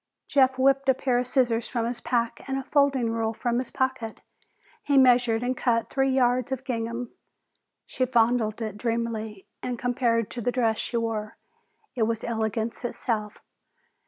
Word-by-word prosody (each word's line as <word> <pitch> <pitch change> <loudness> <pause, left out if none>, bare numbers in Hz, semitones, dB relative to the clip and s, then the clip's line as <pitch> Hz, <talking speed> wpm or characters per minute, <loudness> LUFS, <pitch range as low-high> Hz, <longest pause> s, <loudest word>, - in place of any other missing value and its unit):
Jeff 265 -2 +3
whipped 270 +1 +3
a 265 - +5
pair 250 -2 +1
of 250 - -2
scissors 245 -3 +1
from 235 -3 -2
his 235 +1 -3
pack 235 -1 -1
and 270 0 -1
a 270 - -3
folding 270 -4 +2
ruler 225 -1 -1
from 240 +1 0
his 255 - -4
pocket. 260 -4 -2 0.6
He 285 -1 +1
measured 245 -3 +4
and 255 +1 0
cut 230 -3 0
three 270 0 +2
yards 255 0 +2
of 265 -1 -3
gingham. 235 -1 -3 0.7
She 255 -1 -1
fondled 230 -2 +2
it 210 -2 -5
dreamily, 225 -3 -3 0.2
and 250 -1 -3
compared 235 -2 0
to 240 - -5
the 245 - 0
dress 230 -3 +1
she 235 - -2
wore, 220 -2 -3 0.6
it 225 -3 +1
was 225 -1 -2
elegance 225 0 -2
itself. 220 -3 -3
240 Hz, 165 wpm, -26 LUFS, 225-255 Hz, 0.7 s, a